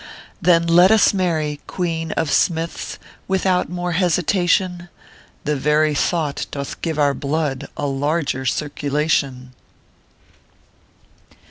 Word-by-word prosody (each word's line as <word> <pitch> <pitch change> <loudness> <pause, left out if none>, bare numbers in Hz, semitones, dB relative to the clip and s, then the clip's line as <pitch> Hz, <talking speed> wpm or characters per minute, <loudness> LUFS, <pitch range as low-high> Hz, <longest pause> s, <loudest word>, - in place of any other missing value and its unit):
Then 170 -1 +4
let 175 +2 +6
us 220 -1 +5
marry, 160 -6 -1
Queen 165 -3 -3
of 160 -3 -1
Smiths, 165 -1 0 0.3
Without 190 -1 +1
more 175 0 -3
hesitation; 180 0 +1 0.5
The 150 0 0
very 150 +2 +2
thought 150 0 -1
doth 140 -1 -6
give 160 -3 -2
our 145 -2 +3
blood 145 -1 -2
A 145 - -2
larger 140 0 -1
circulation 140 -3 -1
160 Hz, 105 wpm, -20 LUFS, 145-175 Hz, 0.5 s, let